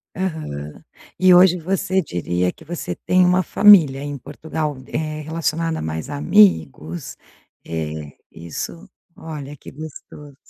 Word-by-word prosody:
Aham. 155 - -5 0.4
E 185 -1 +6
hoje 180 0 +6
você 190 +2 0
diria 90 - -1
que - - -18
você 170 +2 -5
tem 185 0 +2
uma 180 +1 +3
família 165 -10 +6
em 145 0 -5
Portugal, 150 +2 -4
eh, 155 -1 -3
relacionada 165 +1 -2
mais 80 0 -4
a - - -4
amigos, 80 -1 +2 0.5
eh, 80 -2 -5
isso 85 - -7 0.3
olha, 150 -3 -8
que 135 - -12
gostoso. 150 -1 -11
150 Hz, 125 wpm, -21 LUFS, -, 0.5 s, E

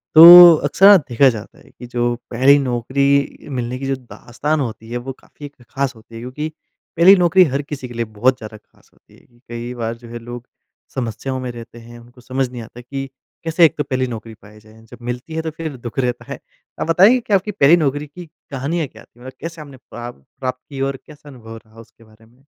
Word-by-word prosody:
तो, 175 +1 +11
अक्सर 165 +7 +2
ना 205 - +10
देखा 130 +3 +4
जाता 110 -4 -8
है - - -20
कि 125 - -12
जो 120 0 -1 0.2
पहली 130 +4 +5
नौकरी 140 +2 -1
मिलने 125 +1 -3
की 135 - -5
जो 135 - 0
दास्तान 130 +4 -4
होती 115 -4 -5
है, 120 - -3
वो 130 +2 -7
काफ़ी 145 - -15
एक 145 - -12
ख़ास 135 -1 -3
होती 115 +1 -16
है, 115 - -8
क्योंकि 140 +5 -5 0.5
पहली 185 +4 +8
नौकरी 180 0 +4
हर 140 - 0
किसी 140 -3 -7
के 120 - -11
लिए 115 0 -3
बहुत 115 +5 0
ज़्यादा 110 -2 -10
ख़ास - - -29
होती - - -25
है। 120 -1 -26
कई 120 +1 -6
बार 115 -1 -4
जो 120 0 -15
है 120 0 -7
लोग 120 +1 -10 0.5
समस्याओं 130 +2 -4
में 130 -1 -5
रहते 120 0 -12
हैं, 120 +1 -13
उनको 120 +1 -18
समझ 130 +1 -2
नहीं 120 -1 -8
आता 115 +2 -12
कि 135 +2 -7 0.3
कैसे 165 +1 +4
एक 155 - +2
तो - - -1
पहली 130 -2 -2
नौकरी 115 -1 -8
पाई 105 +1 -16
जाए 110 +1 -19
जब 120 +2 -14
मिलती 125 +6 -6
है 160 - -1
तो 160 - -4
फिर 160 -4 -5
दुःख 120 +2 -7
रहता 125 -2 -2
है। - - -6 0.4
आप - - -2
बताएँगे 195 +9 +5
कि 225 -3 -4
आपकी 200 +2 +1
पहली 165 -5 +5
नौकरी 145 -2 -1
की 175 +5 -11 0.3
कहानियाँ 145 +4 -3
क्या - - -16
थी 120 - -26
मतलब 130 +2 -10
कैसे 165 -1 -8
आपने 140 -3 -12
प्राप 120 - -11 0.2
प्राप्त 130 -1 -4
की 135 -2 -7
और 135 0 -4
कैसा 150 -1 -15
अनुभव 115 -4 -12
रहा 110 +1 -19
उसके 115 0 -18
बारे 110 0 -22
में? 120 +4 -27
130 Hz, 230 wpm, -19 LUFS, 120-145 Hz, 0.5 s, तो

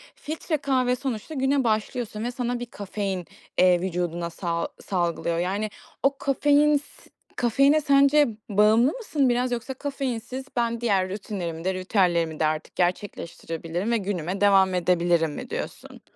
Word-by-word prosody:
Filtre 310 +1 -3
kahve 255 -3 +1
sonuçta 255 +3 -4
güne 270 0 +1
başlıyorsun 220 0 -1
ve 245 - -2
sana 245 -1 -2
bir 245 - -4
kafein, 200 -4 -4 0.3
eee, 180 -1 +5
vücuduna 175 -2 -2
sa 170 0 -2
salgılıyor. 170 -3 -1
Yani, 200 +4 -1 0.3
o 275 0 +2
kafein 290 +2 +3
s 290 - -13 0.3
kafeine 275 +6 +4
sence 280 +1 +5 0.2
bağımlı 215 +6 +4
mısın 310 - 0
biraz 245 +1 +1
yoksa 245 +2 -3
kafeinsiz 260 -2 -4
ben 235 -1 0
diğer 195 -5 +2
rutinlerimi 185 -5 -5
de 190 +1 0
ritüellerimi 180 -4 +1
de 155 - +3
artık 155 0 -2
gerçekleştirebilirim 175 0 -2
ve 235 - +3
günüme 190 -2 -3
devam 195 -2 +5
edebilirim 170 -2 +2
mi - - -7
diyorsun? - - -6
215 Hz, 140 wpm, -25 LUFS, 180-260 Hz, 0.3 s, eee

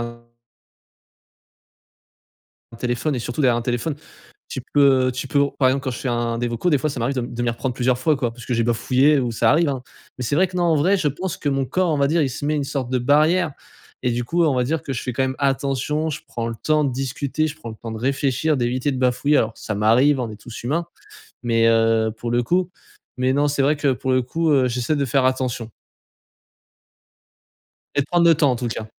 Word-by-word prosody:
un 120 0 -7 2.5
un - - -10
téléphone, 125 +5 -1
et - - -2
surtout 120 +5 -3
derrière 125 -3 +4
un 120 - -2
téléphone. 120 +5 -2 0.5
Tu 130 - -5
peux, 135 -3 +5
heu, - - -1
tu 130 +1 -5
peux 140 - +2 0.2
par 130 -2 +4
exemple, 135 +2 0
quand 130 - -1
je 120 - -6
fais 130 - -3
un 120 -1 -1
des 120 0 -1
vocaux 120 +9 -1
des 145 - +4
fois 155 - -1
ça 130 - -5
m'arrive 135 +4 -1
de - - +1
de 120 0 -5
m'y 120 - +1
reprendre 120 +2 -3
plusieurs 125 0 +1
fois, 150 +2 +2
quoi. 120 -3 -2
Parce 120 0 -12
que 125 - -1
j'ai 115 - +2
bafouillé 130 +5 +3
ou 120 -2 -1
ça - - +2
arrive, 155 +2 +3
hein. 130 -3 -3 0.4
Mais 125 - -3
c'est 145 - -1
vrai 185 +2 +4
que 180 - -8
non 175 - +1
en 165 -2 +3
vrai 185 +7 +3
je 150 - +1
pense 180 +6 -4
que 145 - -2
mon 135 -1 0
corps, 185 +2 0
on 150 - 0
va 140 - +3
dire, 165 0 +2
il 135 - 0
se 130 - -6
met 155 - +1
une 145 -2 -1
sorte 135 -3 -3
de 130 - +1
barrière 155 +5 +3 0.5
et 125 - +1
du 120 0 -1
coup, 170 +7 +1
on 150 -4 +2
va 125 -1 +1
dire 155 +4 -1
que 135 - -4
je 120 - -4
fais 125 - -3
quand 135 - 0
même 130 0 -1
attention, 140 +2 0
je 155 - -5
prends 115 -1 -4
le 115 - -4
temps 155 +3 +1
de 135 - 0
discuter, 135 +4 -2
je 155 0 -5
prends 135 -7 -9
le 110 - -9
temps 115 0 -7
de 110 - -5
réfléchir, 135 +3 0
d'éviter 125 +3 0
de 130 - -3
bafouiller 130 +3 +2
alors, 110 0 0
ça 105 - -4
m'arrive, 125 +7 +4
hein, - - -1
on - - -8
est - - -9
tous 120 -2 -9
humains. 165 +6 -1 0.6
Mais 115 -1 +2
heu, 115 -1 +3
pour 120 - -4
le 120 0 +2
coup, 180 +7 +1 0.5
mais 130 +1 +1
non 145 +1 +2
c'est 145 -1 0
vrai 150 +2 +3
que 145 -2 +1
pour 130 +1 -3
le 130 - +3
coup, 160 +6 -1
heu 130 -3 +4
j'essaie 125 +5 -1
de 140 -1 0
faire 130 0 +1
attention. 130 -3 -1 2.2
Et - - +2
de 140 - -2
prendre 170 +1 +3
le 165 - +7
temps, 145 -2 +3
en - - -1
tout 120 0 -3
cas. 110 -1 -5
130 Hz, 255 wpm, -21 LUFS, 120-150 Hz, 2.5 s, le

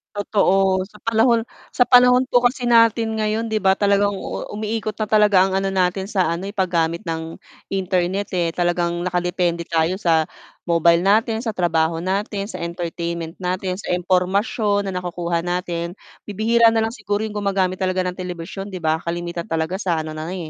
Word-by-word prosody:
Totoo. 195 -2 +2
Sa 210 - -16
panahon 230 0 +3 0.2
sa 245 - +2
panahon 250 0 +6
po 245 -2 +2
kasi 245 +1 +1
natin 230 -1 +4
ngayon, 215 +2 0
di 220 -1 -1
ba, 190 0 +3
talagang 200 0 +3 0.4
umiikot 215 0 -3
na 215 - -1
talaga 210 -3 +4
ang 190 - -2
ano 195 - -1
natin 190 +1 0
sa 190 -5 +1
ano 185 +4 -5
eh, 205 - -11
paggamit 170 -3 0
ng 160 0 -4 0.3
internet 190 0 -1
eh, 175 -2 +1
talagang 175 0 -1
nakadepende 175 -1 -1
tayo 165 +4 0
sa 160 -3 +3 0.4
mobile 170 0 +3
natin 220 +2 +2
sa, 225 - -1
trabaho 165 -3 0
natin, 200 +2 -2
sa - - -6
entertainment 170 0 -4
natin, 185 0 -2
sa 210 - -8
impormasyon 195 +3 +1
na - - -5
nakukuha 175 -1 -2
natin, 175 -1 -3 0.3
bibihira 225 +3 +3
na 225 -1 +2
lang 225 - -4
siguro 205 -4 -2
yung 215 - -6
gumagamit 195 -2 0
talaga 185 0 +1
ng 180 - -9
telebisyon, 180 +2 -6
'di 190 - -6
ba, 160 0 +1
kalimitan 170 0 -4
talaga 165 +3 -1
sa 170 -5 0
ano 155 0 -6
na 155 - -5
lang 180 -3 -5
185 Hz, 175 wpm, -21 LUFS, 170-210 Hz, 0.4 s, panahon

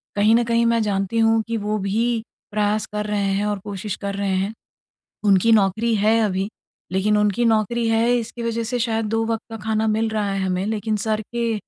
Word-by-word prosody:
कहीं 210 +2 +4
न 240 - +3
कहीं 235 0 +2
मैं 230 -1 +2
जानती 200 +1 -1
हूँ 225 0 +4
कि 230 0 -1
वो 210 0 -1
भी 200 +4 0 0.5
प्रयास 210 0 0
कर 210 0 -2
रहे 200 -2 0
हैं 200 +2 0
और 205 -1 -1
कोशिश 200 0 -4
कर 200 -1 -4
रहे 200 -1 -1
हैं। 195 +3 -1 0.7
उनकी 200 +2 +4
नौकरी 220 +2 +3
है 215 +2 +3
अभी, 195 0 -1 0.4
लेकिन 210 +3 +2
उनकी 210 +3 +2
नौकरी 225 +1 +1
है 225 +2 +3
इसकी 235 +1 -5
वजह 230 0 -1
से 245 - +1
शायद 225 -1 0
2 225 +1 +1
वक़्त 225 -1 -2
का 225 - -6
खाना 220 0 0
मिल 220 +1 +1
रहा 210 -2 -1
है 195 - -1
हमें। 185 0 -1
लेकिन 215 0 -1
सिर 215 0 0
के 235 +1 -2
215 Hz, 210 wpm, -22 LUFS, 200-225 Hz, 0.7 s, कहीं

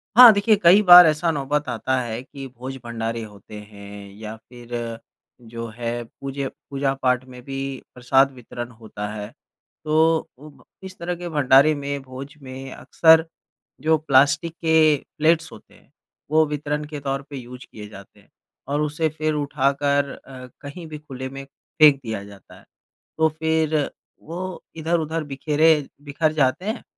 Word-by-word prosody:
हाँ, 245 -1 +11
देखिए 210 +2 +3
कई 180 +5 +7
बार 180 -2 +10
ऐसा 155 +2 +1
नौबत 145 0 -2
आता 130 +3 -1
है 115 -1 -5
कि 135 -2 -9
भोज-भंडारे 120 -2 -6
होते 105 0 -12
हैं 100 -1 -11
या 110 0 -7
फ़िर 120 +1 -16 0.8
जो 115 0 -6
है 120 0 -3
पूजे 135 +3 -6 0.2
पूजा-पाठ 135 -2 0
में 125 -1 -12
भी 135 -1 -6 0.4
प्रसाद 135 +2 +3
वितरण 120 0 -8
होता 105 -2 -6
है। 105 -1 -6 0.6
तो 160 +1 +2
उब 150 +2 -15 0.2
इस 190 0 -9
तरह 175 +1 -3
के 175 0 -7
भंडारे 145 0 +5
में, 140 0 -4
भोज 135 +2 -10
में 130 0 -9
अक्सर 160 0 +4 0.6
जो 160 +1 +3
प्लास्टिक 145 +3 +2
के 160 -2 +5 0.2
प्लेट्स 165 +2 +2
होते - - -15
हैं। - - -24 0.4
वो 155 0 +4
वितरण 150 0 -3
के 150 -1 -7
तौर 135 0 -3
पे 140 - -8
यूज़ 125 +1 -10
किए 105 -1 -9
जाते 100 -2 -14
हैं - - -25 0.4
और 145 +2 -1
उसे 155 +2 0
फ़िर 155 0 -2
उठाकर 140 0 0 0.2
अ, 130 -1 -10
कहीं 160 +4 -9
भी 155 -1 -7
खुले 130 -3 -7
में 135 0 -8
फेंक 145 +1 +3
दिया 110 -3 -4
जाता 100 -1 -15
है। - - -22 0.5
तो 160 0 +3
फ़िर 160 0 0 0.5
वो 180 +3 -6
इधर-उधर 160 0 -1
बिखेरे 150 +3 +2 0.3
बिखर 155 +2 0
जाते 150 +5 +1
हैं, 220 +3 -3
140 Hz, 155 wpm, -22 LUFS, 125-155 Hz, 0.8 s, हाँ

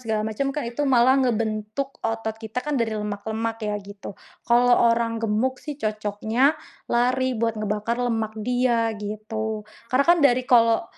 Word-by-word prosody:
segala 220 -3 -1
macam, 245 +6 -2
kan 295 - -3
itu 240 +4 -6
malah 260 0 +4
ngebentuk 230 +2 -2
otot 225 -1 -2
kita 220 +2 -5
kan 300 -1 -1
dari 225 -1 0
lemak-lemak 220 +2 -3
ya 210 0 -1
gitu. 200 0 -9 0.4
Kalau 245 +1 +5 0.2
orang 230 0 -1
gemuk 225 +4 0
sih, 295 -2 -6
cocoknya 215 +3 0 0.4
lari 255 +2 +1
buat 230 0 -1
ngebakar 215 +2 -2
lemak 225 -3 -1
dia 240 -1 +1
gitu. 215 +1 -4 0.2
Karena 260 +3 +2
kan 345 0 +6
dari 255 -2 +4
kalau 230 -2 +4
230 Hz, 155 wpm, -24 LUFS, 215-250 Hz, 0.4 s, kan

